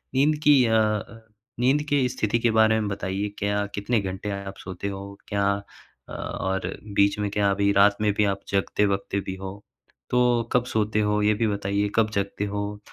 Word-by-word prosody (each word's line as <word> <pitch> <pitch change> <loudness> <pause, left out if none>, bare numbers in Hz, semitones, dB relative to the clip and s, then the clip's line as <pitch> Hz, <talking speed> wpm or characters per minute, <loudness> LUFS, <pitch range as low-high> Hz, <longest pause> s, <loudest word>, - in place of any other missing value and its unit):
नींद 150 +3 +3
की 145 0 +7
अ 110 -1 +3
अ, 110 +1 -1 0.4
नींद 135 +4 +3
के 140 -3 +3
स्थिति 115 -1 0
के 115 0 +2
बारे 110 0 +4
में 105 - -2
बताइए। 100 +1 -3
क्या 105 0 0
कितने 105 +2 0
घंटे 95 +2 -5
आप 95 0 -8
सोते 95 +1 -5
हो? 100 0 -7
क्या 100 -1 0 0.6
अ, - - -8
और 95 -1 -3 0.3
बीच 100 +1 +3
में 105 0 -1
क्या 100 -1 +2
अभी 100 0 +2
रात 100 0 +5
में 105 -1 +3
भी 105 +1 +2
आप - - -19
जगते-वगते 100 0 0
भी 95 - -3
हो? 95 +1 -8 0.5
तो 125 -1 +3
कब 125 -1 +3
सोते 105 0 +1
हो, 105 0 +1
ये 105 +1 +3
भी - - +3
बताइए। 100 0 -1
कब 110 -1 +3
जगते 100 +1 -3
हो? 105 0 -4
105 Hz, 190 wpm, -25 LUFS, 100-110 Hz, 0.6 s, की